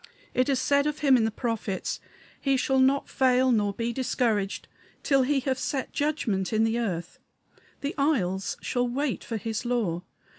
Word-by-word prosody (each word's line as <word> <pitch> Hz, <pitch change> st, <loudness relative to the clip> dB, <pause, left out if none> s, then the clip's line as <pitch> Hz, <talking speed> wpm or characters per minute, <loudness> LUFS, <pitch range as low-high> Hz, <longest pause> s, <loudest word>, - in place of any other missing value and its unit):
It 255 Hz, +2 st, +2 dB
is 270 Hz, -2 st, +2 dB
said 280 Hz, +2 st, +2 dB
of 300 Hz, +1 st, -3 dB
him 270 Hz, -2 st, +7 dB
in 230 Hz, -3 st, +3 dB
the -, -, +2 dB
prophets: 225 Hz, -4 st, -3 dB, 0.4 s
"He 275 Hz, -1 st, +2 dB
shall 265 Hz, +1 st, +2 dB
not 270 Hz, +2 st, +3 dB
fail 260 Hz, -1 st, +3 dB
nor 210 Hz, -3 st, +2 dB
be 230 Hz, +3 st, -3 dB
discouraged 225 Hz, -5 st, -1 dB, 0.4 s
till 275 Hz, -3 st, +4 dB
he 270 Hz, +1 st, +2 dB
have 260 Hz, 0 st, -1 dB
set 260 Hz, +1 st, -2 dB
judgment 240 Hz, -11 st, 0 dB
in 220 Hz, 0 st, +2 dB
the 225 Hz, +1 st, +1 dB
earth. 180 Hz, -7 st, -3 dB, 0.6 s
The 285 Hz, +2 st, -2 dB
isles 195 Hz, -, 0 dB
shall 245 Hz, 0 st, 0 dB
wait 270 Hz, +2 st, -2 dB
for 225 Hz, -, -3 dB
his 220 Hz, +1 st, -3 dB
law. 225 Hz, -9 st, 0 dB
245 Hz, 175 wpm, -27 LUFS, 220-270 Hz, 0.6 s, him